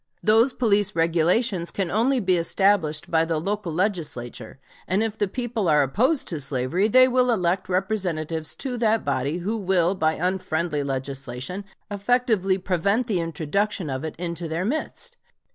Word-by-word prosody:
Those 225 +4 +4
police 210 -5 +1
regulations 170 +4 +1
can 190 -4 -2
only 250 +6 +2
be 185 -4 +2
established 170 -3 +1
by 160 -1 +4
the 165 -1 -1
local 200 +1 -3
Legislature, 155 - -3 0.3
and 190 +4 +1
if 220 -2 -2
the 205 - 0
people 230 -2 -2
are 150 -1 +5
opposed 250 - +1
to 165 - -3
slavery 140 +8 0
they 255 +3 +6
will 250 0 +2
elect 185 -4 0
representatives 180 -5 -2
to 255 -3 -4
that 225 -3 +1
body 140 +3 -1
who 195 +6 -2
will 185 -4 +1
by 160 -4 +1
unfriendly 170 -3 -1
legislation 135 +5 -5 0.3
effectually 205 -2 +1
prevent 195 +5 0
the 210 -6 0
introduction 165 +2 -2
of 130 +2 -4
it 160 - -5
into 170 0 -4
their 165 +3 -2
midst. 315 - -4
185 Hz, 155 wpm, -24 LUFS, 160-215 Hz, 0.3 s, they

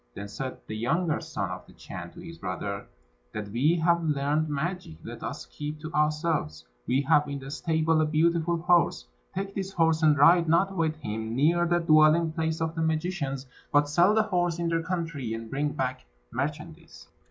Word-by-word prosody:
Then 100 +1 -6
said 130 +6 -5
the 110 - -6
younger 155 +9 0
son - - -4
of - - -7
the - - -16
Chan - - -9
to - - -11
his - - -10
brother, - - -4 0.5
"That 105 -1 -5
we 135 +10 +2
have 170 0 +2
learned 150 +1 0
magic, 155 - -3
let - - -8
us - - -5
keep 150 +1 -6
to 155 +1 -7
ourselves. 150 - 0 0.2
We 130 +2 +2
have 150 +1 +3
in 140 - -3
the 135 0 -8
stable 160 +1 +1
a - - +3
beautiful 165 +2 +2
horse; 170 - +2 0.3
take 195 +1 -3
this 195 -1 -4
horse, 165 -2 +2
and 155 -2 +5
ride 165 +4 +6
not 195 +4 +3
with 160 -3 0
him 110 -5 -4
near 170 +6 +3
the 175 0 +3
dwelling 160 0 +5
place 160 0 -2
of 160 0 -1
the 165 - -3
magicians, 155 -4 -1 0.3
but 145 0 +4
sell 175 +8 +4
the 220 - +4
horse 175 -5 0
in 170 -1 -1
their 165 0 +1
country, 165 -9 -3
and 115 0 -8
bring 145 +2 0
back 130 - -3 0.2
merchandise." 150 +5 -5
155 Hz, 190 wpm, -27 LUFS, 140-170 Hz, 0.5 s, ride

